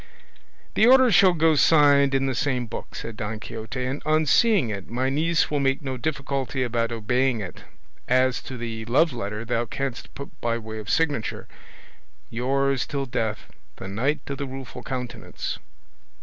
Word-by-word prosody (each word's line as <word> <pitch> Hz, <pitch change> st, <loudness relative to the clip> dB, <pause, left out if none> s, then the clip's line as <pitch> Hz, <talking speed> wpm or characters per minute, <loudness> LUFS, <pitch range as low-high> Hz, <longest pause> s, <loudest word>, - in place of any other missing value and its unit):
"The 220 Hz, -, +5 dB
order 260 Hz, -1 st, +7 dB
shall 185 Hz, -1 st, +6 dB
go 165 Hz, -1 st, +3 dB
signed 145 Hz, -2 st, +5 dB
in 135 Hz, 0 st, +2 dB
the 135 Hz, -, 0 dB
same 125 Hz, 0 st, 0 dB
book," 115 Hz, -, -8 dB
said 115 Hz, -, -6 dB
Don 110 Hz, -1 st, -4 dB
Quixote, 115 Hz, +3 st, -5 dB
"and 135 Hz, +3 st, -3 dB
on 155 Hz, +1 st, +2 dB
seeing 205 Hz, -, +4 dB
it 100 Hz, -2 st, -6 dB
my 130 Hz, +3 st, -1 dB
niece 165 Hz, +4 st, +1 dB
will 145 Hz, -, +1 dB
make 135 Hz, +1 st, +1 dB
no 130 Hz, -1 st, -3 dB
difficulty 135 Hz, -1 st, -2 dB
about 120 Hz, -1 st, -1 dB
obeying 125 Hz, +2 st, +1 dB
it; 95 Hz, -4 st, -7 dB, 0.5 s
as 130 Hz, 0 st, +2 dB
to 130 Hz, -, -8 dB
the 115 Hz, -1 st, -5 dB
loveletter 115 Hz, -5 st, 0 dB
thou 120 Hz, 0 st, 0 dB
canst 135 Hz, +2 st, -5 dB
put 140 Hz, -, -8 dB
by 115 Hz, -1 st, 0 dB
way 110 Hz, -1 st, -7 dB
of 105 Hz, -2 st, -8 dB
signature, 145 Hz, -8 st, 0 dB, 0.8 s
'Yours 135 Hz, +2 st, 0 dB
till 140 Hz, -1 st, -2 dB
death, 110 Hz, -3 st, -3 dB, 0.2 s
the 95 Hz, -, -8 dB
Knight 135 Hz, +10 st, -1 dB
of 140 Hz, -1 st, -5 dB
the 140 Hz, -, -3 dB
Rueful 130 Hz, -1 st, -8 dB
Countenance. 125 Hz, -1 st, -5 dB
130 Hz, 165 wpm, -25 LUFS, 115-140 Hz, 0.8 s, order